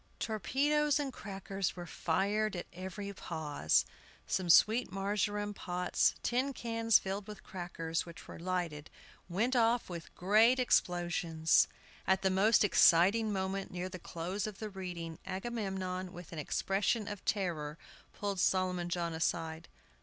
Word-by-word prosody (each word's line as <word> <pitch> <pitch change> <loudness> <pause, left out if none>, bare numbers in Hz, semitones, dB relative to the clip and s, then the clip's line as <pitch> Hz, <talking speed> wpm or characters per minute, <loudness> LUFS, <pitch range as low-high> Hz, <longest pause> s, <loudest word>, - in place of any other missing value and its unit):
Torpedoes 285 +7 +1
and 275 -3 -2
crackers 195 -2 -4
were 175 -1 -6
fired 200 +6 0
at 175 - -4
every 190 +3 -6
pause. 150 - 0 0.4
Some 185 -2 -1
sweet 220 +6 +5
marjoram 205 +1 -1
pots, 180 -2 +1
tin 260 +3 0
cans 230 -2 +3
filled 195 +1 -4
with 210 -1 -9
crackers 165 -3 -3
which 170 -1 -12
were - - -9
lighted, 170 -4 -3 0.4
went 225 +9 +1
off 230 -3 +2
with 170 -2 -8
great 220 +7 +5
explosions. 175 -8 +2 0.4
At 190 0 +3
the 190 - +3
most 210 +5 +4
exciting 205 +3 +5
moment, 190 0 -2
near 180 +1 -4
the 185 - -8
close 180 +5 -4
of 210 -2 -7
the 215 0 -6
reading, 175 -4 -6
Agamemnon, 190 -3 -3
with 175 -3 -10
an 160 - -5
expression 200 - 0
of 205 -3 -6
terror, 165 -7 -1 0.3
pulled 200 -2 -3
Solomon 180 -1 +1
John 170 -1 -1
aside. 160 0 -2
190 Hz, 140 wpm, -33 LUFS, 175-210 Hz, 0.4 s, sweet